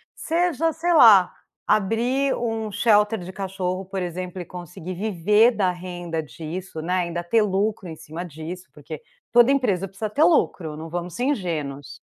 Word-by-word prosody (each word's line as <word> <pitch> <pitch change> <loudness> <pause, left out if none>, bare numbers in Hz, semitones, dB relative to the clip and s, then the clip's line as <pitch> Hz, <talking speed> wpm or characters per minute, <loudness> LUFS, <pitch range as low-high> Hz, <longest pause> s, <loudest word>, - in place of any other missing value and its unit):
Seja, 330 -1 0
sei 340 +2 0
lá, 210 - +8 0.4
abrir 240 +7 +1
um 225 -2 -2
de 205 - -8
shelter 210 -1 +3
de 180 +1 -8
cachorro 190 -1 -3
por 190 0 -4
exemplo 180 +1 -5
e - - -7
conseguir 175 0 -8
viver 210 +4 +3
da 195 -5 +1
renda 175 -2 -5
disso, 160 +5 -7
né, 180 +3 -2
ainda 170 0 -3
ter 215 +6 +2
lucro 200 -2 -1
em 160 - -7
cima 165 +4 -7
disso 170 +4 -8
porque, - - -9 0.3
toda 240 +2 +6
empresa 200 -9 +1
precisa 205 +2 -5
ter 290 +9 +2
lucro, 170 - +2
não 160 +1 -7
vamos 175 +1 -5
ser 245 - -2
ingênuos. 150 - -3
190 Hz, 170 wpm, -23 LUFS, 175-225 Hz, 0.4 s, lá